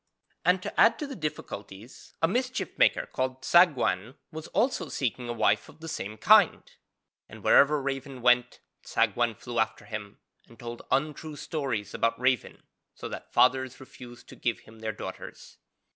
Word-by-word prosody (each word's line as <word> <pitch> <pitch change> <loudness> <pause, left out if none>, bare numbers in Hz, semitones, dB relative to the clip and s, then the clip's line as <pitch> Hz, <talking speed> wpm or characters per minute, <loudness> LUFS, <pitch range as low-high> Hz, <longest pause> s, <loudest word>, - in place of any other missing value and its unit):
And 180 +2 +3
to - - -5
add 230 - +6
to 300 - -4
the 280 -1 -7
difficulties, 110 - -7
a - - +6
mischief 255 +6 -2
maker - - +3
called 130 0 -3
Tsagwan 135 - +3 0.2
was 160 0 -7
also 250 +4 0
seeking 125 -2 -3
a - - 0
wife 105 -3 +1
of - - -17
the 165 - -9
same 110 -8 -5
kind, - - +5 0.7
and - - -12
wherever 150 +1 +5
Raven 135 -2 -5
went 125 0 +3 0.2
Tsagwan 120 -2 +1
flew 120 +2 -5
after 110 0 -1
him, 105 -2 -7 0.3
and 115 - -18
told 120 0 -7
untrue 150 +3 -1
stories 135 -9 -3
about 115 0 0
Raven, 130 -1 0 0.3
so - - -7
that - - -8
fathers 130 0 +2
refused 120 -2 -13
to - - -11
give 120 -2 -2
him 110 0 -17
their 110 0 -3
daughters. 105 - -9
130 Hz, 160 wpm, -28 LUFS, 115-150 Hz, 0.7 s, add